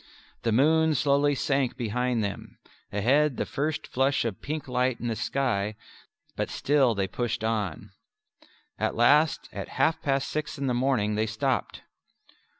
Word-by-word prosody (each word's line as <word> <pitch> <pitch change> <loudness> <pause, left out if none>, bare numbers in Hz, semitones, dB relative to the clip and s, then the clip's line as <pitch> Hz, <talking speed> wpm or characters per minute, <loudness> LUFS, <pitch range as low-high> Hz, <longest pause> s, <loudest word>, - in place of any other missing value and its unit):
The 115 - 0
moon 155 +6 +4
slowly 145 +1 +2
sank 135 -2 0
behind 120 0 -1
them; 100 -2 -6 0.3
ahead 130 +7 +2
the - - -1
first 155 +1 -2
flush 135 0 +1
of 110 -5 -4
pink 155 0 -4
lighted 125 -1 0
the 115 - -1
sky; 110 -4 -1 0.6
but - - -2
still 135 -5 +2
they 95 -1 0
pushed 120 +1 -3
on. 105 -7 -2 0.9
At - - 0
last 145 +6 +4
at - - -5
half 140 +5 +2
past 135 -3 0
six 155 0 -3
in 140 - -3
the 125 - +1
morning 120 -4 +1
they 110 +1 0
stopped. 130 +4 -2
130 Hz, 150 wpm, -27 LUFS, 115-145 Hz, 0.9 s, moon